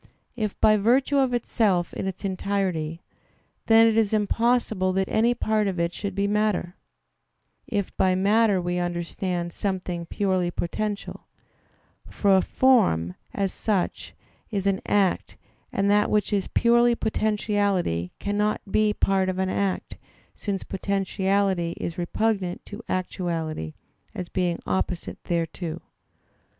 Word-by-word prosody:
If 215 -4 -3
by 215 0 +5
virtue 260 +7 +3
of 265 -2 +2
itself 210 -7 +1
in - - -3
its 190 +1 -5
entirety, 185 -4 -2 0.6
then 225 0 +7
it 225 -1 +3
is 220 -2 +2
impossible 215 -2 +1
that 190 0 0
any 235 +2 +2
part 215 -3 +1
of 185 -3 -2
it 170 0 0
should 200 +2 -4
be 200 - +1
matter, 205 -3 0 0.9
if 200 -2 -2
by 185 -1 +3
matter 205 +1 +3
we 175 0 -1
understand 175 0 -3
something 180 -3 -3
purely 185 -3 0
potential: 205 +4 -4 0.8
for 200 -2 +3
a 190 - +5
form, 190 - +3 0.2
as 195 -2 -1
such, 200 -5 -2 0.3
is 200 -3 -2
an 195 -1 +1
act; 200 -3 +1 0.3
and 195 0 0
that 210 0 +3
which 210 0 +1
is 200 -2 0
purely 235 0 +4
potentiality 205 - 0
cannot 210 +1 0
be 215 -1 +2
part 190 -1 +2
of 185 - -2
an 190 0 0
act, 195 0 -2 0.4
since 200 -2 -3
potentiality 195 -2 0
is 170 +2 -4
repugnant 190 0 -1
to 205 +2 -8
actuality 165 - -3 0.4
as 180 - -5
being 180 -2 0
opposite 180 -2 -2
thereto. 170 -1 -2
195 Hz, 130 wpm, -25 LUFS, 180-215 Hz, 0.9 s, then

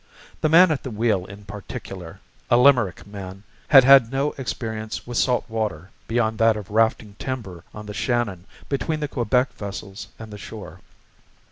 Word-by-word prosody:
The 155 - +2
man 170 +2 +7
at 150 - -1
the 130 - -6
wheel 105 -5 0
in 100 +1 -12
particular, 95 -3 -8 0.3
a 120 - +5
Limerick 125 -7 +4
man, 100 -1 -9 0.2
had 135 -3 +8
had 135 -3 +7
no 140 +2 0
experience 110 -3 -5
with 120 -1 -2
salt 125 -1 +1
water 105 -7 -3 0.2
beyond 110 -1 0
that 115 -1 +4
of 105 -2 -9
rafting 110 -1 +1
timber 105 -10 -5
on 105 0 -9
the 105 - -7
Shannon 110 -7 -1 0.2
between 155 +3 -2
the 150 - -2
Quebec 125 0 0
vessels 100 -1 -7
and 110 -1 -10
the 105 - -8
shore. 110 -1 -9
110 Hz, 165 wpm, -23 LUFS, 100-125 Hz, 0.3 s, had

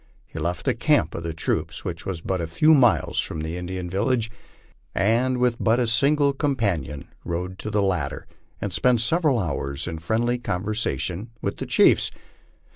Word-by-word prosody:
He - - -8
left 85 +1 -2
the - - +3
camp - - +2
of - - -4
the 85 0 -3
troops, 80 - -3
which 85 -1 -5
was 90 -4 -3
but 95 +1 -2
a 85 - -2
few 150 - +4
miles 125 -8 +3
from 80 - -2
the 80 +2 -4
Indian 90 0 -4
village, 115 +5 0 0.6
and 120 +5 +2
with 125 -1 +2
but 115 +2 +3
a 125 - +2
single 140 +5 +3
companion 110 - -1 0.2
rode 90 +2 -4
to - - -4
the 105 -1 +1
latter, 90 -8 -1 0.3
and - - -3
spent 125 -2 +3
several 150 +1 +2
hours 70 -8 -2
in 80 -2 -4
friendly 120 +8 0
conversation 105 -1 -2
with - - -3
the - - -5
chiefs. - - +4
100 Hz, 175 wpm, -24 LUFS, 85-120 Hz, 0.6 s, few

